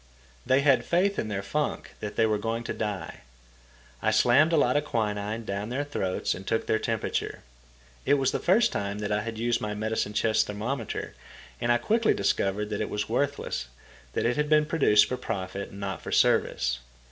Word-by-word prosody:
They 130 +1 +4
had 140 -3 +4
faith 195 +4 +1
in - - -2
their 100 -2 -3
funk 150 +9 -2
that 105 -1 -5
they 115 - +3
were 110 -1 +1
going 115 +2 -2
to - - -3
die. 105 -3 -4 0.8
I - - +2
slammed 140 +7 +4
a 165 - +3
lot 125 -3 +3
of 145 - +2
quinine 110 -3 -2
down 100 +2 -3
their 135 +4 -1
throats 95 -10 -1
and 95 +2 -9
took 115 - 0
their 110 - +1
temperature. 115 -2 -2 0.6
It 140 - +4
was 135 -2 +1
the - - -1
first 205 +6 +3
time 100 0 -3
I 105 0 0
had 115 +1 -5
used 120 +1 0
my 105 0 -3
medicine 110 -1 -1
chest 110 0 +2
thermometer, 110 +4 -4 0.5
and 120 - +2
I 120 - +5
quickly 220 - +2
discovered 100 +1 0
that 105 - -2
it 110 - -2
was 105 +1 -2
worthless, 130 - -1 0.5
that - - -1
it 120 +3 +1
had 150 0 0
been 150 0 +5
produced 130 -10 +4
for 125 - -3
profit 100 -3 -4
and 100 - -11
not 95 -4 -4
for - - -7
service. - - +2
110 Hz, 195 wpm, -27 LUFS, 105-135 Hz, 0.8 s, I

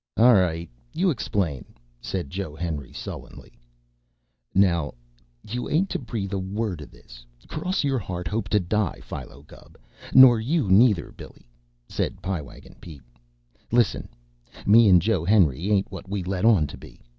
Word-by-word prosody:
"All 120 +2 +7
right, 85 -4 +1 0.3
you 185 +1 +2
explain," 95 - -2 0.4
said 90 -3 -4
Joe 95 -5 -5
Henry 75 -6 -5
sullenly. - - -9 1.0
"Now 85 -7 +2 0.5
you 120 +4 -4
ain't 185 +6 +1
to - - -2
breathe 105 -6 -5
a 100 - -1
word 95 -2 -3
of 75 - -10
this, - - -16 0.2
cross 180 +4 -2
your 135 -3 0
heart, 90 -4 -5
hope 105 +1 -3
to 105 - +3
die, 100 0 -1
Philo 70 +3 -9
Gubb. - - -17 0.3
Nor 130 -3 +8
you 135 - 0
neither, 105 -2 +4
Billy," - - -14 0.4
said - - -3
Pie 95 -4 -3
Wagon 70 - -14
Pete. 75 -7 -12 0.7
"Listen! 120 -3 +1 0.6
Me 110 +1 +6
an' 90 -2 +6
Joe 95 -3 0
Henry 90 -3 +2
ain't 100 -2 +1
what 95 - -9
we 100 -2 -3
let 95 +2 -2
on 105 -9 +5
to - - -9
be. - - -14
95 Hz, 155 wpm, -24 LUFS, 85-115 Hz, 1.0 s, Nor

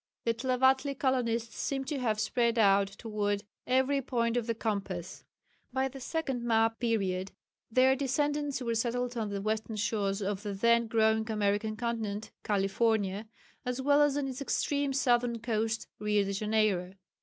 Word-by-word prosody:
The 230 - +2
Tlavatli 260 +3 +2
colonists 235 -4 0
seem 270 -1 -2
to 275 +1 -3
have 220 -4 0
spread 235 +1 +1
out 200 -2 +5
towards 205 0 -2 0.2
every 265 +2 +2
point 235 -2 0
of 240 -1 -1
the 230 - 0
compass. 195 -6 -3 0.5
By 265 +1 +1
the 270 +1 -10
second 270 -2 -2
map 225 -1 +2
period 195 -5 0 0.4
their 255 +3 +4
descendants 285 0 -1
were 235 -1 0
settled 245 +2 -1
on 220 -3 -2
the 200 -1 -4
western 220 +1 -2
shores 205 -1 0
of 195 0 -2
the 205 -1 -4
then 235 +3 +3
growing 220 0 +2
American 210 0 0
continent 220 -3 -3
(California) 205 0 0 0.4
as 250 0 -3
well 285 +2 +4
as 290 -1 +3
on 285 -2 -1
its 260 +1 -5
extreme 285 0 0
southern 245 -3 +2
coasts 225 -1 -1
(Rio 210 -1 +2
de 200 0 -3
Janeiro). 210 -3 +1
230 Hz, 155 wpm, -30 LUFS, 210-255 Hz, 0.5 s, out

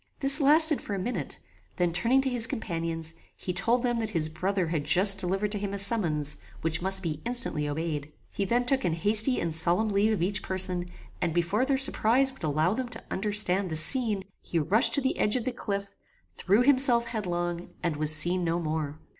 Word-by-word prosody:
This 275 +2 +6
lasted 305 +2 +4
for 205 - -6
a - - -5
minute; 185 - -5 0.4
then 175 -2 -2
turning 240 +9 0
to 265 - -2
his 240 -2 0
companions, 165 -5 -4 0.2
he 180 - -6
told 235 +7 -1
them 240 -2 -2
that 220 -2 -3
his 165 -6 -1
brother 180 +2 -3
had 160 -3 -3
just 190 +6 +7
delivered 195 +3 -3
to 205 - -2
him 200 0 -5
a - - -5
summons, 170 -9 +1 0.2
which 160 0 -3
must 190 +1 0
be 155 -3 -5
instantly 235 -12 +2
obeyed. 150 -1 -5 0.2
He 200 - -3
then 240 +5 -1
took 265 +1 0
an 170 - -2
hasty 215 +8 +5
and 165 -1 -3
solemn 175 +7 +4
leave 205 +2 0
of 190 - -3
each 200 +2 -2
person, 185 -1 -1 0.3
and, 170 -2 -3
before 175 +8 -1
their 275 -1 0
surprize 265 0 +1
would 265 - -16
allow 155 +4 -1
them 250 +1 -5
to 240 - -7
understand 200 -2 0
the 160 - -4
scene, 210 - +1 0.2
he 170 - -5
rushed 200 - +2
to 280 - -1
the 265 - -3
edge 210 - +1
of 245 - -3
the 255 - -2
cliff, 200 -4 -6 0.4
threw 205 +6 0
himself 255 -3 +3
headlong, 175 -6 -5
and 170 -3 -2
was 155 +1 +4
seen 175 +4 +3
no 165 0 -2
more. 155 -2 -5
195 Hz, 205 wpm, -26 LUFS, 165-235 Hz, 0.4 s, just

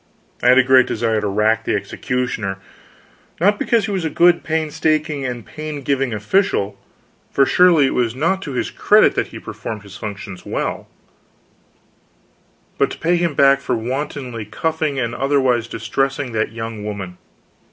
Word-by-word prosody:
I - - +1
had 125 - +7
a 130 - +7
great 130 0 +5
desire 110 -1 0
to 105 - -1
rack 105 +3 +1
the - - 0
executioner; 120 -6 -3 0.8
not 205 +5 +3
because 230 -4 +2
he 215 - -4
was 190 -3 -1
a 160 - 0
good, 175 +2 +4
painstaking 155 -2 0
and 120 -4 -5
paingiving 140 - -3
official, 105 - 0 0.5
for 135 - +3
surely 175 -2 +5
it - - 0
was 120 -1 0
not 170 +8 0
to 145 -7 -6
his 125 - -2
discredit - - +4
that - - -1
he - - -10
performed 105 -2 -7
his 100 0 -11
functions 100 -3 -7
well - - -3 1.9
but - - +3
to - - -7
pay 175 +2 +1
him 170 -4 0
back 140 0 +5
for - - -1
wantonly 125 0 -4
cuffing 155 +5 -2
and 120 -3 -1
otherwise 130 -4 +1
distressing 135 +4 -2
that 110 -1 -1
young 115 -2 -6
woman. 95 -4 -6
130 Hz, 160 wpm, -19 LUFS, 110-155 Hz, 1.9 s, had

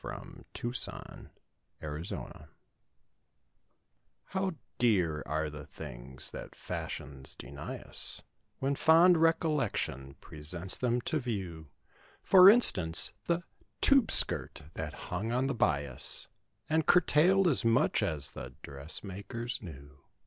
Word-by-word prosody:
29 - - -8
THE - - -15
TUBE 120 +1 -4 1.0
SKIRT'S 75 +3 -6
PASSING 80 -11 -8 1.8
How 190 -1 -2 0.3
dear 90 -10 +2
are 80 +2 -1
the 75 0 -10
things 65 -1 -9
that - - -9
the - - -24
fashions 65 -1 -4
deny - - -8
us, - - -2 0.3
When 135 +1 -1
fond 165 +5 +5
recollection 145 - 0
presents 85 +5 -4
them 125 -1 0
to 155 - -2
view— 95 - -5 0.6
For 185 0 +8
instance: 90 - +5
The 170 +1 0 0.4
"tube 275 -5 +4
skirt" - - +3
that 75 -2 -5 0.2
hung 100 +6 -2
on 125 +2 0
the 135 - -1
bias 70 - -2 0.4
And 160 0 0
curtailed 180 +3 +4
as 150 - +1
much 115 +1 +2
as 80 -9 -1
the 65 0 -9
dressmakers 100 - -3
knew. 70 -6 -12
100 Hz, 120 wpm, -30 LUFS, -, 1.8 s, For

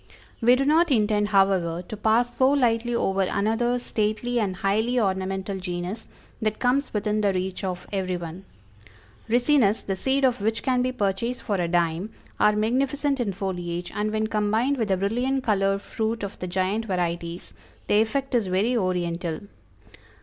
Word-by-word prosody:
We 240 +2 +6
do 270 +1 0
not 325 +4 +4
intend 210 -4 +2
however 190 -4 +2
to 200 - -7
pass 225 +3 +1
so 260 0 +5
lightly 240 -4 +2
over 195 -4 +1
another 225 +6 +1
stately 240 +1 -1
and 195 -4 -1
highly 220 +6 +1
ornamental 190 -1 -1
genus 180 +4 -5 0.3
that 215 -1 0
comes 260 +3 +1
within 210 0 0
the 200 -1 +3
reach 185 +1 -3
of 180 -2 -3
everyone. 180 -2 -3 0.9
Ricinus, 240 -2 +3
the 195 - -1
seed 270 +7 0
of 250 -4 +1
which 220 +2 0
can 255 -2 +2
be 255 +1 0
purchased 230 +2 -2
for 205 - -1
a 175 -2 0
dime, 170 +3 0 0.3
are 210 - +4
magnificent 275 +6 0
in 225 -5 0
foliage, 175 -2 -4
and 210 +1 -1
when 215 0 0
combined 220 +5 +1
with 225 -4 0
the 190 -2 +1
brilliant 245 +7 0
colored 195 -2 +1
fruit 220 0 -2
of 200 - -6
the 180 - -4
giant 190 +5 -1
varieties, 175 -3 -3 0.3
the 210 - +4
effect 270 +5 -1
is 230 -5 +2
very 200 +7 +1
oriental. 175 -5 -1
210 Hz, 165 wpm, -25 LUFS, 190-240 Hz, 0.9 s, We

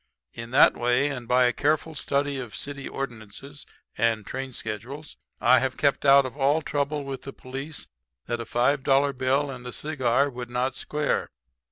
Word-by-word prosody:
In 115 -1 -7
that 130 - +6
way 125 +4 +2
and 125 -4 -5
by 125 +1 +4
a 125 - +2
careful 155 +2 0
study 140 -1 -1
of 120 -4 -7
city 140 -1 -5
ordinances 135 +2 -7 0.3
and 110 -1 +1
train 130 0 -5
schedules 120 +7 -6 0.2
I 125 +1 +5
have 130 +1 -2
kept 140 0 +1
out 140 0 +7
of 130 - -6
all 145 +3 +2
trouble 145 0 -1
with 135 -2 -5
the 135 - -7
police 135 +4 -7 0.4
that 120 0 -2
a - - -6
five 130 +4 +1
dollar 140 +1 +3
bill 135 +2 +1
and 125 -2 -8
a - - -5
cigar 140 -2 0
could 120 -1 -7
not 125 +2 -1
square. 150 +2 -1
135 Hz, 180 wpm, -26 LUFS, 125-140 Hz, 0.4 s, out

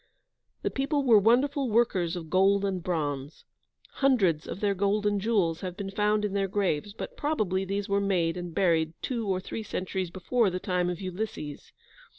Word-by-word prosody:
The - - 0
people 280 +1 0
were 230 -5 +6
wonderful 260 +5 +2
workers 195 -6 +2
of 165 -3 -7
gold 195 +2 +4
and 190 -2 -1
bronze. 150 -5 -3 0.5
Hundreds 200 - +2
of - - -5
their 205 -1 +1
golden 205 +1 +1
jewels 195 -6 +1
have 180 -1 -5
been 195 -1 -5
found 210 +1 +1
in 200 - -3
their 195 -1 +1
graves, 195 -3 -1
but 210 - -7
probably 210 - 0
these 200 +1 -2
were 200 0 +1
made 180 -4 +1
and 175 -1 -5
buried 165 -3 +2
two 235 -4 -2
or 190 -1 +1
three 205 - -5
centuries 185 -3 -3
before 195 +5 +1
the 180 0 -3
time 180 -1 0
of 180 - -4
Ulysses. 185 -6 -5
195 Hz, 175 wpm, -28 LUFS, 180-210 Hz, 0.5 s, were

